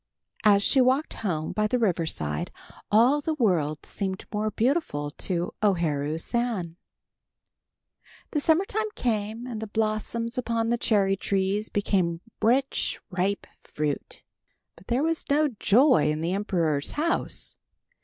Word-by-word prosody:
As 205 -2 +5
she 265 - +4
walked 260 +4 +2
home 160 -7 -2
by 215 0 +1
the 250 - +1
river 180 -8 +1
side, 75 - -2 0.4
all 245 +8 +5
the 315 +2 -1
world 165 - +1
seemed 190 -2 -4
more 210 +1 0
beautiful 220 - 0
to 175 +2 -3
O 205 -3 +4
Haru 150 -2 -1
San. 200 -4 -2 1.6
The 300 - +1
summer 320 +5 +3
time 435 +2 -1
came 220 0 -2
and 235 -4 -5
the 220 - -4
blossoms 225 +3 -1
upon 230 -2 -1
the 240 - +2
cherry 195 -4 +2
trees 195 +2 -1
became 180 -4 0 0.2
rich, 260 +5 +1
ripe 190 +3 -1 0.2
fruit. 150 -1 -4 0.5
But 170 - -19
there 245 +4 +1
was 325 0 -1
no 295 +1 +3
joy 230 - +5
in 150 +1 -1
the 170 +3 -1
emperor's 170 -8 0
house. 335 +3 -1
210 Hz, 140 wpm, -26 LUFS, 175-245 Hz, 1.6 s, As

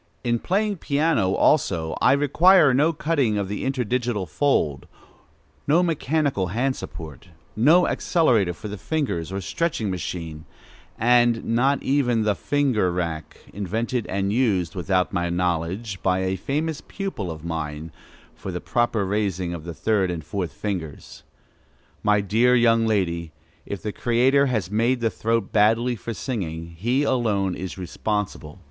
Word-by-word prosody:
In 120 -1 +1
piano 205 - 0 0.4
playing - - +2
also, 95 - +2
I - - +5
require 150 +2 +5
no 150 +6 +3
cutting 145 -9 0
of 100 -1 -1
the 105 +2 -4
interdigital 125 -5 -1
fold, 75 - 0 0.8
no 165 +5 +4
mechanical 150 - 0
hand 125 +8 0
support, 80 -6 -9 0.3
no 155 +11 +5
accelerator 115 - +2
for 95 +6 -8
the 105 -1 -7
fingers 110 - -2
or 95 - -3
stretching 115 - -2
machine; 85 -3 -5 0.5
and 120 0 +3
not 130 +4 +1
even 125 -5 +1
the 105 -1 +2
"finger 130 -8 +1
rack" 85 -3 -4 0.2
invented 110 +4 -2
and 100 +1 -1
used, 100 -9 +1
without 90 -1 0
my 85 -2 0
knowledge, 90 +4 -2
by 95 0 +1
a 95 0 0
famous 150 - -2
pupil[A] 195 - -5
of 80 0 -9
mine, 80 -1 -4 0.4
for - - -7
the - - -4
proper 120 -4 0
raising 95 -3 -1
of 85 -2 -7
the 85 - -5
third 105 -4 +1
and 85 -4 -4
fourth 90 0 -4
fingers. 90 -8 -6 0.8
My 105 0 +3
dear 115 +6 +3
young 115 -1 +4
lady, 85 -6 -1 0.3
if 100 - -5
the 105 - -2
Creator 130 +4 +3
has 110 -8 -2
made 120 +4 +1
the 115 -2 0
throat 115 -2 -1
badly 115 +3 +3
for 115 +2 -6
singing, 85 - -4
he 120 - 0
alone 105 -8 +1
is 95 +1 -6
responsible. 95 -3 -4
105 Hz, 145 wpm, -23 LUFS, 90-125 Hz, 0.8 s, I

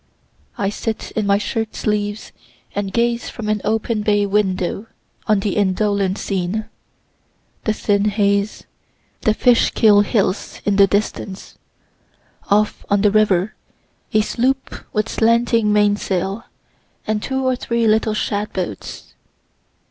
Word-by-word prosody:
I 195 - 0
sit 220 +1 -4
in 215 -2 -1
my 200 0 +4
shirt 220 +1 -3
sleeves 210 0 -2 0.4
and 200 -1 -2
gaze 235 +1 0
from 220 -3 -6
an 215 -1 0
open 220 0 0
bay 205 -1 +2
window 195 0 -1 0.4
on 210 -3 +3
the 200 -2 -1
indolent 200 0 +1
scene 195 +3 -2 1.0
the 215 - +2
thin 205 -1 +1
haze, 200 0 +1 0.6
the 215 - +2
Fishkill 220 -3 +4
hills 205 -2 -1
in 205 -1 +2
the 200 -1 +7
distance 200 0 -3 0.9
off 210 +1 +2
on 200 0 +3
the 210 -1 +4
river, 205 -2 +2 0.6
a 215 - +4
sloop 260 +5 -1 0.2
with 215 0 0
slanting 230 -1 +2
mainsail, 205 -1 0 0.6
and 215 -1 -1
two 265 +2 -2
or 255 0 +2
three 235 -1 -1
little 220 0 +2
shad 210 0 -2
boats. 175 - -6
210 Hz, 125 wpm, -19 LUFS, 200-220 Hz, 1.0 s, the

